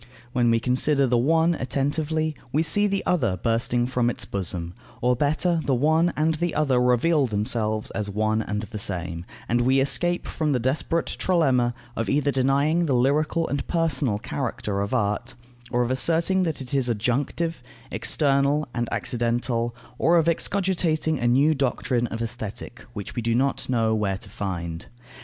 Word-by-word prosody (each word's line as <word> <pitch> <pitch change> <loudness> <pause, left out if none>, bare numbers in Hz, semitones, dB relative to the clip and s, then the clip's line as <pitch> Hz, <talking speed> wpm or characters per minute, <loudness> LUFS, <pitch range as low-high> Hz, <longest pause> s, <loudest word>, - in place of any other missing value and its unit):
When 120 -2 +2
we 115 0 +3
consider 135 +4 +2
the 120 -2 +2
one 160 +6 +3
attentively, 155 +3 -1 0.2
we 155 +4 +2
see 205 +6 +2
the 195 -1 -2
other 120 - +1
bursting 115 +4 0
from 125 -1 +1
its - - -4
bosom, 90 -3 -3 0.3
or 125 +1 +2
better, 155 +6 +1
the 135 - +1
one 160 +6 +3
and 155 +2 +2
the 175 +2 -2
other 140 -5 +2
reveal 130 +4 +3
themselves 110 0 -1
as 105 -2 -3
one 110 +2 0
and 105 0 -3
the 110 0 -7
same, 85 -3 -2 0.2
and 120 +1 +1
we 130 +2 +3
escape 175 +6 +1
from 155 -3 -1
the 125 - +1
desperate 140 +7 0
trilemma, 130 -9 +1 0.2
of 115 - -2
either 145 0 +2
denying 140 +6 +2
the 135 - +2
lyrical 150 +6 +1
and 140 - -3
personal 155 -9 0
character 105 -4 -3
of 100 - -3
art, 120 +2 -1 0.3
or 120 0 +1
of 120 - -2
asserting 165 +8 +2
that 160 -5 -1
it 130 0 -6
is 135 -3 +2
adjunctive, 125 +8 -1 0.3
external 140 0 +1
and 120 -1 -2
accidental, 120 0 -1 0.2
or 170 +1 +4
of 165 -1 +2
excogitating 170 -4 +1
a 120 - 0
new 140 +6 +4
doctrine 125 -3 0
of 115 +1 -4
Aesthetic, 115 0 -6
which 105 -4 -7
we 120 - -1
do 115 0 0
not 135 +2 0
know 115 -3 +2
where 100 -3 0
to 100 +1 -10
find. 85 -5 -5
130 Hz, 170 wpm, -24 LUFS, 115-155 Hz, 0.3 s, or